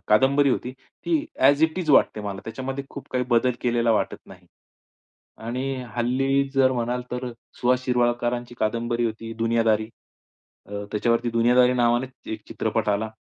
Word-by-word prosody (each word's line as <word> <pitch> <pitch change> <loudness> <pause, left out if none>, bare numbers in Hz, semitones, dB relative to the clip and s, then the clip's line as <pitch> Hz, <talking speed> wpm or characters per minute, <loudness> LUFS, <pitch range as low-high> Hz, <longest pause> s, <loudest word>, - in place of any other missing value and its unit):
कादंबरी 135 +6 +4
होती. 125 0 -2 0.3
ती 345 - -2 0.3
ॲज 140 +3 +5
इट 160 +3 +2
इज 160 -4 -1
वाटते 110 - +4
मला 100 -1 -5
त्याच्यामध्ये 135 +4 -5
खूप 140 - -9
काही 125 -1 0
बदल 120 +1 +3
केलेला 120 -1 +1
वाटत 105 - 0
नाही. - - -15 0.9
आणि 130 +4 -3 0.2
हल्ली 135 +3 +1
जर 130 -1 +4
म्हणाल 125 0 -2
तर 125 +1 -3 0.3
सुहास 125 +1 +2
शिरवाळकरांची 120 0 0
कादंबरी 115 +2 0
होती 115 0 -4
दुनियादारी, 115 -1 +2 0.8
अ, 100 0 -5
त्याच्यावरती 115 +2 +1
दुनियादारी 125 +2 +4
नावाने 120 +1 +2 0.3
एक 110 -1 -6
चित्रपट - - -1
आला. 105 +2 0
120 Hz, 145 wpm, -24 LUFS, 115-130 Hz, 0.9 s, ॲज